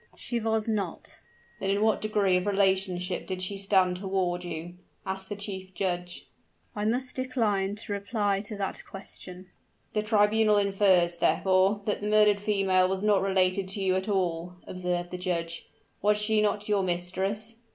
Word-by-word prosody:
"She 240 Hz, -2 st, -3 dB
was 220 Hz, -1 st, 0 dB
not." 215 Hz, -3 st, -3 dB, 0.4 s
"Then 195 Hz, -, -1 dB
in 200 Hz, +2 st, +2 dB
what 220 Hz, -1 st, +2 dB
degree 205 Hz, -3 st, +2 dB
of 180 Hz, +2 st, 0 dB
relationship 190 Hz, -2 st, +1 dB
did 185 Hz, -1 st, -3 dB
she 200 Hz, +2 st, -3 dB
stand 190 Hz, -2 st, +2 dB
toward 185 Hz, -2 st, -1 dB
you?" 175 Hz, +1 st, -6 dB, 0.3 s
asked 190 Hz, 0 st, -4 dB
the 205 Hz, -, -3 dB
chief 190 Hz, -2 st, -7 dB
judge. 175 Hz, -1 st, -3 dB, 0.5 s
"I 210 Hz, 0 st, -2 dB
must 250 Hz, +4 st, -1 dB
decline 215 Hz, -7 st, 0 dB
to 210 Hz, -1 st, -5 dB
reply 200 Hz, -1 st, 0 dB
to 210 Hz, -, -6 dB
that 195 Hz, -1 st, -3 dB
question." 185 Hz, -1 st, -9 dB, 0.4 s
"The 210 Hz, -, +1 dB
tribunal 215 Hz, 0 st, +3 dB
infers, 195 Hz, -4 st, +3 dB
therefore, 190 Hz, +5 st, +2 dB
that 210 Hz, -, -1 dB
the 205 Hz, -, -2 dB
murdered 210 Hz, -1 st, +5 dB
female 195 Hz, -3 st, +2 dB
was 190 Hz, +1 st, -2 dB
not 205 Hz, -3 st, +4 dB
related 190 Hz, 0 st, +1 dB
to 195 Hz, +2 st, -3 dB
you 185 Hz, -1 st, +2 dB
at 190 Hz, +3 st, -2 dB
all," 180 Hz, -3 st, -1 dB
observed 180 Hz, -1 st, -3 dB
the 180 Hz, -, -5 dB
judge. 170 Hz, -2 st, -3 dB, 0.3 s
"Was 210 Hz, +1 st, +3 dB
she 210 Hz, 0 st, +2 dB
not 210 Hz, 0 st, 0 dB
your 205 Hz, -2 st, +2 dB
mistress?" 190 Hz, +5 st, -2 dB
195 Hz, 165 wpm, -28 LUFS, 185-210 Hz, 0.5 s, murdered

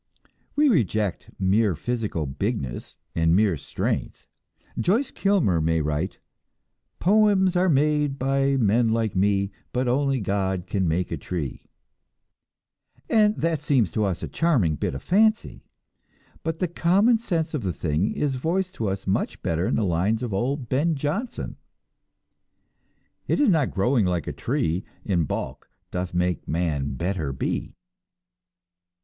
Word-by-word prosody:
We 300 Hz, +1 st, +4 dB
reject 110 Hz, -, +1 dB
mere 100 Hz, 0 st, +2 dB
physical 105 Hz, -4 st, -2 dB
bigness 70 Hz, -, -4 dB, 0.2 s
and 80 Hz, 0 st, +3 dB
mere 100 Hz, -3 st, +3 dB
strength. 70 Hz, -, -3 dB, 0.5 s
Joyce 225 Hz, +10 st, +1 dB
Kilmer 175 Hz, -, +2 dB
may 80 Hz, +1 st, +2 dB
write: 75 Hz, +4 st, -2 dB, 0.8 s
"Poems 195 Hz, -2 st, +3 dB
are 180 Hz, +1 st, +3 dB
made 150 Hz, -1 st, +2 dB
by 135 Hz, +1 st, +1 dB
men 115 Hz, 0 st, +3 dB
like 110 Hz, -2 st, 0 dB
me, 100 Hz, +1 st, +2 dB, 0.2 s
But 125 Hz, +1 st, 0 dB
only 135 Hz, +1 st, +1 dB
God 95 Hz, -3 st, -1 dB
can 95 Hz, -1 st, -1 dB
make 85 Hz, +3 st, 0 dB
a 85 Hz, -, -2 dB
tree" 75 Hz, -3 st, -5 dB, 1.5 s
And 215 Hz, -1 st, +4 dB
that 165 Hz, -3 st, -1 dB
seems 130 Hz, -, +2 dB
to 110 Hz, -, 0 dB
us 95 Hz, -4 st, -1 dB
a -, -, -2 dB
charming 125 Hz, -, +1 dB
bit 70 Hz, -, -2 dB
of 70 Hz, -, -7 dB
fancy; 215 Hz, +4 st, +1 dB, 0.7 s
but 160 Hz, 0 st, -3 dB
the 180 Hz, -, 0 dB
common 195 Hz, +8 st, +3 dB
sense 165 Hz, -8 st, -2 dB
of 150 Hz, -, -1 dB
the 95 Hz, -4 st, -1 dB
thing 80 Hz, +4 st, -1 dB
is 140 Hz, -3 st, -1 dB
voiced 180 Hz, +7 st, -1 dB
to 110 Hz, -, -1 dB
us 95 Hz, 0 st, -4 dB
much 95 Hz, -, -1 dB
better 85 Hz, +2 st, 0 dB
in -, -, +1 dB
the 110 Hz, -, +1 dB
lines 95 Hz, +7 st, +1 dB
of 115 Hz, -5 st, -3 dB
old 125 Hz, +6 st, -1 dB
Ben 150 Hz, +7 st, +1 dB
Jonson: 160 Hz, -, -3 dB, 1.7 s
"It -, -, +1 dB
is 285 Hz, -8 st, +5 dB
not 155 Hz, -7 st, +2 dB
growing 115 Hz, +2 st, +2 dB
like 90 Hz, -2 st, -1 dB
a -, -, -4 dB
tree 85 Hz, +4 st, -1 dB, 0.2 s
In 90 Hz, -6 st, +1 dB
bulk -, -, -5 dB, 0.2 s
doth 90 Hz, 0 st, -3 dB
make 90 Hz, 0 st, -1 dB
man 75 Hz, -5 st, -1 dB
better 85 Hz, -1 st, -2 dB
be." 65 Hz, -, -3 dB
110 Hz, 145 wpm, -25 LUFS, -, 1.7 s, is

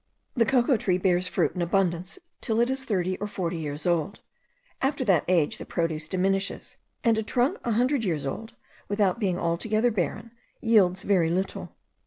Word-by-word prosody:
The 230 Hz, -3 st, +2 dB
cocoa 255 Hz, 0 st, +3 dB
tree 185 Hz, -3 st, +1 dB
bears 185 Hz, -1 st, +1 dB
fruit -, -, +1 dB
in 180 Hz, -, -3 dB
abundance 175 Hz, 0 st, 0 dB, 0.2 s
till 225 Hz, 0 st, 0 dB
it 240 Hz, +2 st, +3 dB
is 265 Hz, 0 st, -2 dB
thirty 185 Hz, -3 st, -1 dB
or 205 Hz, -, -3 dB
forty 175 Hz, -4 st, -3 dB
years 150 Hz, 0 st, -5 dB
old; 175 Hz, +3 st, 0 dB, 0.6 s
after 270 Hz, -1 st, 0 dB
that 185 Hz, -8 st, +3 dB
age 170 Hz, -5 st, +2 dB
the -, -, -5 dB
produce 160 Hz, -2 st, -2 dB
diminishes, 195 Hz, +2 st, -1 dB, 0.3 s
and 225 Hz, -2 st, +3 dB
a -, -, +1 dB
trunk 245 Hz, +5 st, 0 dB
a 235 Hz, -, 0 dB
hundred 250 Hz, +3 st, +2 dB
years 160 Hz, -8 st, -1 dB
old, 225 Hz, -, -5 dB, 0.3 s
without 205 Hz, 0 st, +1 dB
being 190 Hz, -5 st, 0 dB
altogether 215 Hz, +8 st, +1 dB
barren, 215 Hz, +3 st, -3 dB, 0.3 s
yields 195 Hz, -5 st, +3 dB
very 180 Hz, -5 st, +2 dB
little. 185 Hz, +3 st, -3 dB
195 Hz, 175 wpm, -26 LUFS, 175-225 Hz, 0.6 s, cocoa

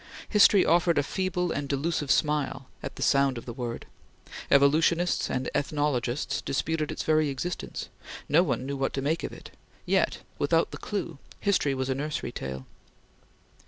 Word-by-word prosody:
History 205 Hz, -2 st, +6 dB
offered 170 Hz, 0 st, +3 dB
a 145 Hz, -, +3 dB
feeble 180 Hz, +2 st, -1 dB
and 140 Hz, -1 st, -3 dB
delusive 145 Hz, +1 st, -1 dB
smile 145 Hz, -3 st, +1 dB
at -, -, -6 dB
the -, -, -3 dB
sound 140 Hz, -2 st, +3 dB
of 115 Hz, -, -8 dB
the 120 Hz, -, -6 dB
word; 120 Hz, -1 st, -5 dB, 0.6 s
evolutionists 160 Hz, +5 st, +3 dB
and 130 Hz, -, -2 dB
ethnologists 140 Hz, -2 st, -1 dB
disputed 155 Hz, +3 st, -1 dB
its -, -, -4 dB
very 155 Hz, -1 st, +2 dB
existence; 170 Hz, +6 st, -4 dB, 0.4 s
no 160 Hz, +4 st, +5 dB
one 130 Hz, -7 st, -1 dB
knew 140 Hz, +1 st, -3 dB
what 135 Hz, 0 st, -1 dB
to 135 Hz, -, -2 dB
make 160 Hz, +4 st, 0 dB
of -, -, -3 dB
it; -, -, -11 dB, 0.3 s
yet, -, -, +1 dB, 0.2 s
without -, -, +2 dB
the -, -, -6 dB
clue, -, -, -4 dB, 0.2 s
history 185 Hz, -9 st, +1 dB
was 130 Hz, 0 st, -2 dB
a 135 Hz, -, +1 dB
nursery 150 Hz, +3 st, -3 dB
tale. 65 Hz, 0 st, -6 dB
145 Hz, 160 wpm, -27 LUFS, 135-165 Hz, 0.6 s, History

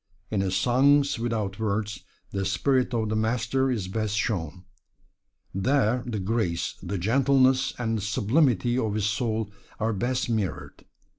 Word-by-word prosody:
In 105 Hz, -3 st, +1 dB
his 95 Hz, -1 st, -1 dB
"Songs 135 Hz, +6 st, +3 dB
Without 110 Hz, -4 st, -2 dB
Words," 105 Hz, -1 st, -2 dB, 0.3 s
the 95 Hz, -1 st, -2 dB
spirit 125 Hz, +7 st, +1 dB
of 110 Hz, -3 st, -1 dB
the 110 Hz, -, -1 dB
Master 120 Hz, +4 st, +1 dB
is 110 Hz, -7 st, -2 dB
best 105 Hz, +1 st, -2 dB
shown. 90 Hz, -6 st, -2 dB, 0.9 s
There 125 Hz, +3 st, +2 dB
the 115 Hz, -3 st, -2 dB
grace, 95 Hz, -4 st, -1 dB
the 100 Hz, -, -3 dB
gentleness 130 Hz, +6 st, +3 dB
and 115 Hz, -2 st, -1 dB
the -, -, -5 dB
sublimity 120 Hz, -, +2 dB
of 110 Hz, -4 st, -1 dB
his 105 Hz, -2 st, 0 dB
soul 110 Hz, 0 st, -1 dB, 0.3 s
are 110 Hz, +1 st, 0 dB
best 125 Hz, +5 st, -1 dB
mirrored. 110 Hz, -5 st, -3 dB
110 Hz, 145 wpm, -26 LUFS, 100-125 Hz, 0.9 s, Songs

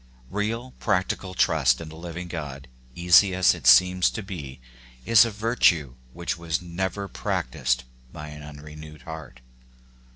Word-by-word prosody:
Real, 115 Hz, +5 st, -3 dB
practical 95 Hz, -2 st, -1 dB
trust 70 Hz, -7 st, +3 dB
in 80 Hz, -, -8 dB
the 80 Hz, -, -11 dB
living 85 Hz, +1 st, -7 dB
God, 70 Hz, -5 st, -7 dB, 0.3 s
easy 90 Hz, +2 st, +5 dB
as 95 Hz, -1 st, +4 dB
it 65 Hz, -, -5 dB
seems 90 Hz, +8 st, +6 dB
to 110 Hz, -, -6 dB
be, 75 Hz, -9 st, -8 dB, 0.5 s
is 115 Hz, 0 st, +7 dB
a -, -, -2 dB
virtue 105 Hz, -, +1 dB, 0.2 s
which 85 Hz, +3 st, -4 dB
was 80 Hz, -2 st, -2 dB
never 95 Hz, +3 st, -4 dB
practised 65 Hz, -6 st, -2 dB, 0.3 s
by 75 Hz, 0 st, -8 dB
an 75 Hz, 0 st, -10 dB
unrenewed 75 Hz, +1 st, -11 dB
heart. 80 Hz, -6 st, -9 dB
85 Hz, 140 wpm, -25 LUFS, 75-95 Hz, 0.5 s, is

